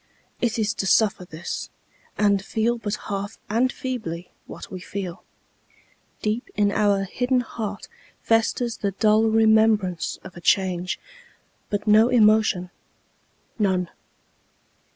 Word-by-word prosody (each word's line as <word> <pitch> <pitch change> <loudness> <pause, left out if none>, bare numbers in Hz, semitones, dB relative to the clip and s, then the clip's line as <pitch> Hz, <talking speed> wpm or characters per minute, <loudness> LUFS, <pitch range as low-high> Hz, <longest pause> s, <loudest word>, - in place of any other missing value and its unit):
It 235 -2 0
is 215 -1 0
to 195 - -3
suffer 205 -3 +3
this, 170 0 -6 0.5
And 200 -2 +2
feel 230 +3 0
but 210 -2 -2
half, 200 +1 -4
and 245 +4 +2
feebly, 185 -10 -5 0.2
what - - -10
we 185 - -6
feel. 185 -1 -6 1.0
Deep 220 +3 -1
in 205 -1 +2
our 200 -2 +2
hidden 250 +6 0
heart 215 -3 -6 0.4
Festers 225 +1 +1
the 200 -2 -2
dull 215 +2 +3
remembrance 220 -5 +3
of 190 - -11
a 175 - -10
change, 185 -1 +1 0.7
But 205 0 -2
no 215 +2 +6
emotion 215 -6 +3 0.9
none. 185 -4 +1
210 Hz, 120 wpm, -24 LUFS, 190-225 Hz, 1.0 s, no